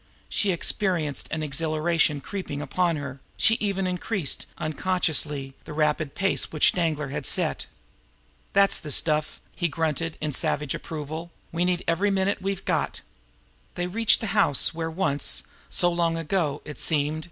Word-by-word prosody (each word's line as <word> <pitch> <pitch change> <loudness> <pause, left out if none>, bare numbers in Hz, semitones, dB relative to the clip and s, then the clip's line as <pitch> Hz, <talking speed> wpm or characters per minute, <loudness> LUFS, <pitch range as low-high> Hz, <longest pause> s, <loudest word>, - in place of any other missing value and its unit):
She 205 - +2
experienced 170 -5 +1
an 155 0 -3
exhilaration 155 0 +1
creeping 185 -5 -5
upon 170 +4 0
her; 140 -2 -6 0.2
she 220 - +5
even 195 -2 0
increased, 180 -2 -2
unconsciously, 155 -4 0
the - - -7
rapid 150 -1 0
pace 195 0 0
which 155 - +4
Danglar 155 -5 -1
had 140 -2 -2
set. - - +1 0.9
"That's 195 0 +5
the 150 - -6
stuff!" 155 +1 +2 0.2
he 175 - 0
grunted 160 0 -2
in 155 -1 -2
savage 145 +1 0
approval. 160 +2 -6 0.2
"We 170 +2 0
need 180 -1 0
every 180 +5 +2
minute 195 0 +1
we've 195 0 -3
got." - - -1 0.7
They 175 - -1
reached 220 +5 +2
the 225 - -2
house 155 -10 +4
where 165 0 -3
once 160 -4 +1 0.3
so 175 0 +2
long 170 -1 +1
ago 160 -3 -1
now, - - -6
it - - -7
seemed! 150 0 +2
165 Hz, 155 wpm, -25 LUFS, 150-180 Hz, 0.9 s, she